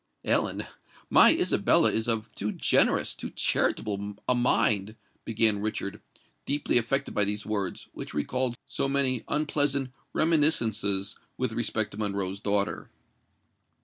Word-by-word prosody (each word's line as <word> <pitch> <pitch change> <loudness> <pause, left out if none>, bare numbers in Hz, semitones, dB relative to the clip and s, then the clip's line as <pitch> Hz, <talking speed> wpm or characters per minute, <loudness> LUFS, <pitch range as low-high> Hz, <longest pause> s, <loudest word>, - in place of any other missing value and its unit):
"Ellen, - - 0 0.5
my - - +7
Isabella - - +3
is 110 +1 -1
of 115 -1 0
too 105 +1 -3
generous—too - - +2
charitable 100 -1 0
a 125 - +3
mind——" 110 -4 +1 0.3
began 110 -2 +2
Richard, 105 -2 -4 0.5
deeply 145 -3 +2
affected 120 +4 -2
by 105 - +3
these 105 +1 -2
words, 100 -4 -3
which - - -8
recalled 125 - -1
so 135 - -2
many 135 -3 0
unpleasant 145 -3 0 0.2
reminiscences 115 -11 +1 0.2
with 130 -2 -1
respect 110 -2 -1
to - - -10
Monroe's 100 -2 -3
daughter. 100 0 -1
110 Hz, 120 wpm, -27 LUFS, 100-130 Hz, 0.5 s, my